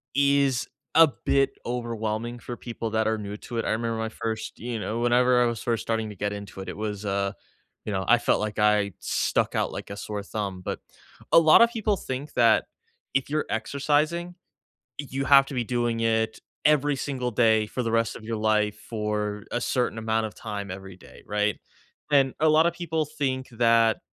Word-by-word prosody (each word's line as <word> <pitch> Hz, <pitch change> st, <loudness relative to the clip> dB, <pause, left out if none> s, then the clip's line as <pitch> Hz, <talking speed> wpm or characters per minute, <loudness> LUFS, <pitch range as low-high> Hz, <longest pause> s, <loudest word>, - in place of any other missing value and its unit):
is 140 Hz, -2 st, +3 dB, 0.3 s
a 165 Hz, 0 st, +9 dB, 0.2 s
bit 135 Hz, 0 st, +3 dB
overwhelming 120 Hz, -1 st, -3 dB
for 120 Hz, +1 st, -6 dB
people 115 Hz, -1 st, -5 dB
that 110 Hz, 0 st, +1 dB
are 110 Hz, 0 st, +1 dB
new 105 Hz, -1 st, -6 dB
to 120 Hz, -, -7 dB
it. 115 Hz, -, -1 dB
I -, -, 0 dB
remember 115 Hz, +1 st, -1 dB
my 110 Hz, 0 st, -2 dB
1st 110 Hz, -1 st, -5 dB
you 120 Hz, -1 st, -4 dB
know, 110 Hz, +2 st, -3 dB
whenever 125 Hz, +1 st, +4 dB
I -, -, +3 dB
was 115 Hz, -3 st, -2 dB
first 115 Hz, -2 st, -1 dB
starting 110 Hz, -1 st, -1 dB
to 105 Hz, -, -9 dB
get 100 Hz, +2 st, -2 dB
into 100 Hz, -2 st, -8 dB
it 95 Hz, -, -7 dB
it -, -, -7 dB
was, 105 Hz, -1 st, -4 dB
uh, 100 Hz, 0 st, -1 dB, 0.5 s
you -, -, -3 dB
know, 95 Hz, -1 st, -1 dB
I 120 Hz, -, +6 dB
felt -, -, +2 dB
like 105 Hz, -1 st, -3 dB
I 105 Hz, -2 st, +3 dB
stuck -, -, 0 dB
out -, -, 0 dB
like -, -, -7 dB
a 100 Hz, -, -6 dB
sore 105 Hz, -1 st, -5 dB
thumb, 100 Hz, -2 st, -4 dB
but -, -, -4 dB, 0.5 s
a -, -, +8 dB
lot 160 Hz, +5 st, +7 dB
of 235 Hz, -, +7 dB
people 215 Hz, -3 st, 0 dB
think 135 Hz, -1 st, -5 dB
that 115 Hz, -2 st, +4 dB, 0.5 s
if 135 Hz, 0 st, 0 dB
you're 150 Hz, +1 st, 0 dB
exercising, 155 Hz, +5 st, 0 dB, 0.6 s
you 135 Hz, -1 st, -3 dB
have 135 Hz, 0 st, +7 dB
to 140 Hz, -, -7 dB
be 125 Hz, -2 st, 0 dB
doing 120 Hz, -1 st, -1 dB
it 110 Hz, -1 st, 0 dB, 0.3 s
every 145 Hz, -1 st, +3 dB
single 130 Hz, -3 st, -2 dB
day 110 Hz, -1 st, +3 dB
for 125 Hz, +4 st, -3 dB
the 115 Hz, -1 st, -2 dB
rest 115 Hz, -1 st, +1 dB
of -, -, -11 dB
your 115 Hz, 0 st, -3 dB
life 105 Hz, -1 st, +1 dB
for 105 Hz, -2 st, -2 dB
a 120 Hz, -, 0 dB
certain 120 Hz, -1 st, 0 dB
amount 110 Hz, 0 st, 0 dB
of 110 Hz, -, -9 dB
time 100 Hz, -3 st, -6 dB
every 95 Hz, 0 st, -8 dB
day, -, -, -16 dB
right? 105 Hz, 0 st, 0 dB, 0.5 s
And 135 Hz, -3 st, +4 dB
a 155 Hz, -, +4 dB
lot 155 Hz, +2 st, +5 dB
of 170 Hz, -, +1 dB
people 160 Hz, -2 st, -1 dB
think 130 Hz, -3 st, -2 dB
that, 115 Hz, -1 st, +3 dB
115 Hz, 205 wpm, -26 LUFS, 105-135 Hz, 0.6 s, a